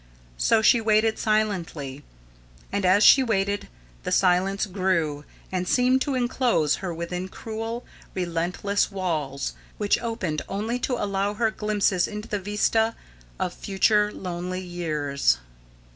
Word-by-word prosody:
So 220 - +3
she 235 +1 +5
waited 220 0 +2
silently, 170 -10 -1 0.7
and 200 -2 +1
as 200 +3 +5
she 270 - +8
waited 205 -4 0 0.3
the - - -4
silence 190 +2 +2
grew 175 -7 -1 0.3
and 185 -1 -2
seemed 255 +4 +3
to 280 -1 0
enclose 240 - +1
her 185 -2 -4
within 170 +2 -4
cruel, 225 +3 -5 0.3
relentless 180 +4 -1
walls 155 -8 -2 0.2
which 205 +2 +1
opened 225 -10 -2
only 220 +5 -2
to 250 - -1
allow 200 -2 -1
her 225 0 +1
glimpses 205 -4 +1
into 210 +1 -6
the 205 - -2
vista 215 +3 +1 0.4
of 180 - -1
future 210 +2 +2
lonely 180 0 -4
years. 150 - 0
195 Hz, 130 wpm, -25 LUFS, 175-220 Hz, 0.7 s, she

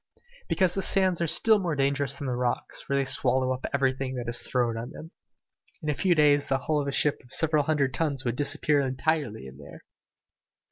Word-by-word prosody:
"Because 185 -3 +2
the 195 - -1
sands 185 -3 +2
are 170 - +1
still 210 +7 +3
more 175 -5 -1
dangerous 140 0 0
than 140 - -6
the 130 - -1
rocks, 125 0 -2
for 140 - -3
they 140 0 +1
swallow 130 0 +1
up 130 - -5
everything 135 -1 0
that 120 -1 -5
is 120 0 -2
thrown 120 -3 0
on 115 +2 -5
them. 160 +3 -11 0.7
In 150 - -2
a - - -3
few 180 +1 +2
days 145 -2 +4
the 135 - +1
hull 150 +2 -1
of 140 - -4
a - - -1
ship 145 +1 +1
of 125 - -19
several 155 -3 +1
hundred 140 -4 +1
tons 140 -3 -1
would 120 -1 -1
disappear 145 +1 +1
entirely 135 - -1
in 65 +1 -12
there!" 70 - -12
140 Hz, 215 wpm, -27 LUFS, 130-155 Hz, 0.7 s, days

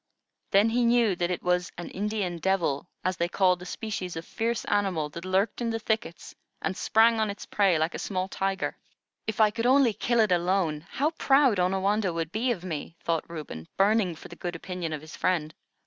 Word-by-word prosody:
Then 205 +3 +4
he 240 +2 +2
knew 235 -4 +4
that 175 0 0
it 180 - -3
was 180 0 +1
an 175 - -6
"Indian 200 -4 -2
devil," 175 -6 0 0.2
as 185 -1 0
they 170 - +1
called 180 0 +2
a 180 - -8
species 190 -4 -4
of 165 0 -5
fierce 230 +1 -2
animal 190 -7 0
that 170 +4 -8
lurked 190 +5 0
in 235 - 0
the 225 - -1
thickets 220 -4 -3 0.3
and 190 - -2
sprang 225 +3 +4
on 215 -1 +1
its 200 - -6
prey 195 -5 +2
like 160 +2 0
a - - -5
small 185 -2 -2
tiger. 195 0 -2 0.5
"If 220 0 -3
I 215 -1 +6
could 230 +2 -1
only 260 -3 +5
kill 235 +3 0
it 215 -3 +4
alone, 175 -3 +1
how 295 +4 0
proud 270 - +3
Onawandah 190 +1 +1
would 165 -1 -3
be 235 +5 0
of 185 -7 -3
me," 165 -1 -5
thought 165 -1 -1
Reuben, 150 - -7
burning 195 -3 +3
for - - -11
the 170 - -11
good 175 0 -5
opinion 175 -1 -5
of 155 -2 -4
his 155 -1 -10
friend. 160 -4 0
190 Hz, 210 wpm, -27 LUFS, 170-220 Hz, 0.5 s, I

